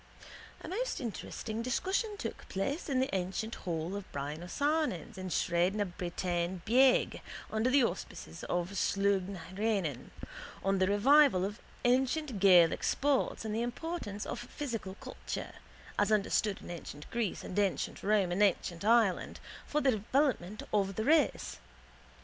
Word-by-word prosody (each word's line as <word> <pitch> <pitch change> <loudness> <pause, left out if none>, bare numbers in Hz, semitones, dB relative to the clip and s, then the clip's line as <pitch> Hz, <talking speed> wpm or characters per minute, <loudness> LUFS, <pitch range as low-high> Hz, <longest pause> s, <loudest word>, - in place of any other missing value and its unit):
A - - -8
most - - -2
interesting 225 -2 -4
discussion 385 - -1
took - - -6
place 275 - -2
in 265 -2 +2
the 260 -6 0
ancient 190 +5 -2
hall 170 +1 -3
of 200 -2 -7
Brian 145 +3 -4
O'Ciarnain's 290 - -1
in 185 -1 -5
Sraid 175 +2 +1
na 210 - +1
Bretaine 175 -1 -3
Bheag, 255 +3 +4 0.3
under 220 +3 +1
the 270 0 +5
auspices 80 - -4
of 175 +1 -1
Sluagh 200 -1 +1
na 195 -3 -6
h - - -11
Eireann, 195 - -1 0.5
on 195 0 +2
the 185 - +3
revival 220 0 +5
of 205 +3 -5 0.3
ancient 260 0 +2
Gaelic 180 -4 +6
sports 280 -4 +1
and 215 - -2
the 225 - 0
importance 240 -4 -4
of - - -4
physical 235 -6 -5
culture, - - -6 0.5
as - - +3
understood 210 -1 +1
in - - -7
ancient 150 -3 -8
Greece 235 -5 -2
and 185 - -2
ancient 200 -2 0
Rome 200 -3 +2
and 180 +4 0
ancient 185 -3 +1
Ireland, 225 -3 +3 0.3
for 300 - 0
the 270 - +4
development 220 -3 0
of 195 -2 +1
the 220 - -1
race. 300 - +2
205 Hz, 150 wpm, -32 LUFS, 185-255 Hz, 0.5 s, Gaelic